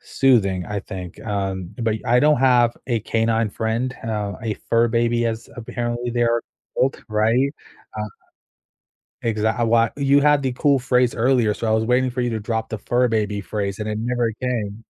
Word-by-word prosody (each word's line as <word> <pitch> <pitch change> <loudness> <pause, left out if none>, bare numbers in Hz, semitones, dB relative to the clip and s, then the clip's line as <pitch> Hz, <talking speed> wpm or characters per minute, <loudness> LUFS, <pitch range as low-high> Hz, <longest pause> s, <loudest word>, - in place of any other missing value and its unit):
soothing, 100 -9 +2
I 105 -1 -3
think, 90 -1 -8
um, 95 -3 -2
but 115 -2 0
I 120 +1 +4
don't 150 0 +5
have 120 -2 +4
a 120 -3 0
canine 115 0 +1
friend, 115 +5 -2
uh, 105 -3 -2
a 110 -2 -2
fur 115 0 +3
baby, 120 0 +1
as 115 0 -4
apparently 120 +1 -3
they 120 0 0
are 115 0 +2 0.3
called, 135 +2 0
right? 115 +6 +2 0.5
Uh 105 0 -3 1.1
Exact 110 +1 0
a - - +2
lot 115 0 +3
you 140 0 +4
had 145 0 +4
the 130 - 0
cool 140 +1 +3
phrase 125 -1 +1
earlier, 120 -3 +2
so 115 - -4
I - - +2
was 110 0 +1
waiting 125 +1 +2
for 125 - -5
you 120 - 0
to 110 - -2
drop 110 +1 -3
the 110 - -3
fur 125 +4 +1
baby 105 -3 -1
phrase 100 -1 -3
and 105 - -3
it 105 - -2
never 120 -1 0
came. 115 -3 -3
115 Hz, 190 wpm, -22 LUFS, 110-125 Hz, 1.1 s, don't